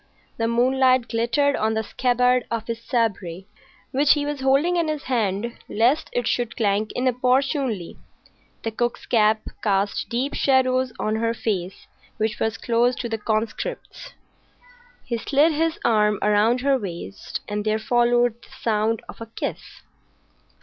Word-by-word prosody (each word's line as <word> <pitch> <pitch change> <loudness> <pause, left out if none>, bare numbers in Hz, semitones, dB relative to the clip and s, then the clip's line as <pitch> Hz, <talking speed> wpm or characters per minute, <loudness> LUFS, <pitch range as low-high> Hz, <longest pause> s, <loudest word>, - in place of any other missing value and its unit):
The 225 - 0
moonlight 255 +1 +3
glittered 240 +5 +1
on 220 +1 0
the 220 - 0
scabbard 250 +2 +1
of 230 -1 -3
his 230 0 -4
sabre, 200 -8 -1 0.5
which 280 +2 +4
he 290 -1 -1
was 290 -1 -3
holding 275 +7 +3
in 340 -2 +1
his 305 -2 -3
hand 230 -2 -1
lest 240 +8 +2
it 245 - -1
should 240 -1 -1
clank 210 -1 +1
inopportunely. 255 - 0 0.6
The 225 - -2
cook's 240 +2 -2
cap 220 -1 +3 0.2
cast 200 -1 0
deep 255 +4 -1
shadows 260 -1 +2
on 215 +1 -1
her 230 +1 0
face, 190 -5 -3 0.3
which 220 -1 -1
was 220 0 -1
close 240 +1 +1
to 235 - -4
the 225 -1 -3
conscript's. 230 - -3 0.9
He 235 -2 -2
slid 290 +7 +3
his 320 +1 0
arm 210 -2 +3
round 210 +4 +3
her 275 0 +2
waist, 170 - -6
and 210 0 -3
there 215 0 +1
followed 240 +1 +2
the - - -18
sound 220 0 +1
of - - -11
a 230 - -6
kiss. 225 - -6
235 Hz, 150 wpm, -23 LUFS, 220-260 Hz, 0.9 s, which